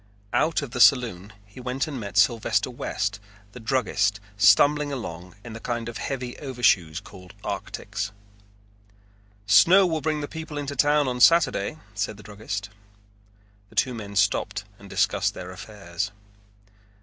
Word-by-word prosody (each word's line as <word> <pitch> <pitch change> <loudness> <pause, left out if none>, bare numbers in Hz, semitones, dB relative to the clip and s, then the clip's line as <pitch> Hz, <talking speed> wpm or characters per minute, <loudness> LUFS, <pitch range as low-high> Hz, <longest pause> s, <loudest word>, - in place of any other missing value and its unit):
Out 155 -1 +2
of 135 - -7
the 125 - -1
saloon 110 -8 +4
he 100 +4 -14
went 125 +2 -2
and 145 -5 -5
met 100 -3 -6
Sylvester 115 -4 +2
West 105 +1 -3 0.3
the 125 - -10
druggist 110 -4 0 0.2
stumbling 145 +9 +5
along 90 -9 -6
in 120 - -9
the 115 - -7
kind 120 -1 -3
of 115 -2 -6
heavy 125 -3 -4
overshoes 105 - +1
called 90 -2 -14
arctics. 105 -1 -4 1.4
"Snow 165 - +7
will 160 -3 -1
bring 155 0 -1
the 145 - -4
people 160 -1 -7
into 140 -1 -4
town 145 +1 +3
on 125 -1 -2
Saturday," 165 +2 +4 0.2
said 100 +1 -3
the 105 - -13
druggist. 100 -1 -6 1.0
The - - -19
two 130 - +2
men 100 -3 -7
stopped 100 0 +1 0.2
and 100 - -13
discussed 100 +1 +1
their 90 0 -7
affairs. 100 -2 -5
110 Hz, 150 wpm, -25 LUFS, 100-135 Hz, 1.4 s, Snow